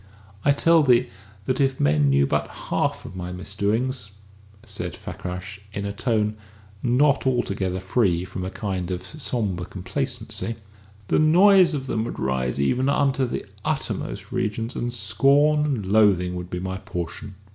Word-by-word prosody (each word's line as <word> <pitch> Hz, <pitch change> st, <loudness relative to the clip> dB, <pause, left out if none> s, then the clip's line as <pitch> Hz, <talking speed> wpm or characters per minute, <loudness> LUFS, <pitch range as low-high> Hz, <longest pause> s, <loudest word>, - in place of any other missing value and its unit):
I 145 Hz, -, +5 dB
tell 165 Hz, +3 st, +4 dB
thee 125 Hz, -3 st, +4 dB, 0.4 s
that 130 Hz, +4 st, 0 dB
if 135 Hz, -1 st, +1 dB
men 75 Hz, 0 st, +3 dB
knew 70 Hz, 0 st, +4 dB
but -, -, 0 dB
the -, -, -14 dB, 0.2 s
half -, -, 0 dB
of -, -, -9 dB
my 90 Hz, -1 st, -5 dB
misdoings," 100 Hz, +5 st, -1 dB, 0.5 s
said 100 Hz, -6 st, -5 dB
Fakrash, 90 Hz, +2 st, -7 dB
in 100 Hz, 0 st, -3 dB
a 100 Hz, -, -3 dB
tone 110 Hz, -1 st, 0 dB, 0.4 s
not 135 Hz, +3 st, +3 dB
altogether 100 Hz, -7 st, 0 dB
free 95 Hz, -2 st, +1 dB
from 95 Hz, 0 st, -6 dB
a 95 Hz, -, -3 dB
kind 95 Hz, -3 st, -3 dB
of 90 Hz, 0 st, -4 dB
sombre 110 Hz, -, -2 dB
complacency, 115 Hz, +3 st, -4 dB, 0.5 s
"the -, -, +3 dB
noise 180 Hz, +2 st, +6 dB
of 135 Hz, -2 st, -4 dB
them 115 Hz, -4 st, -1 dB
would -, -, -5 dB
rise 65 Hz, 0 st, -1 dB
even 125 Hz, -, +2 dB
unto 135 Hz, -2 st, +2 dB
the -, -, -4 dB, 0.2 s
uppermost -, -, -3 dB
regions, 115 Hz, +3 st, -2 dB
and 120 Hz, 0 st, -2 dB
scorn 140 Hz, +7 st, +3 dB
and 130 Hz, -9 st, -1 dB
loathing 95 Hz, -3 st, +3 dB
would 90 Hz, 0 st, -6 dB
be 90 Hz, -, -3 dB
my 95 Hz, +1 st, -3 dB
portion." 95 Hz, +2 st, -6 dB
105 Hz, 155 wpm, -24 LUFS, 90-130 Hz, 0.5 s, noise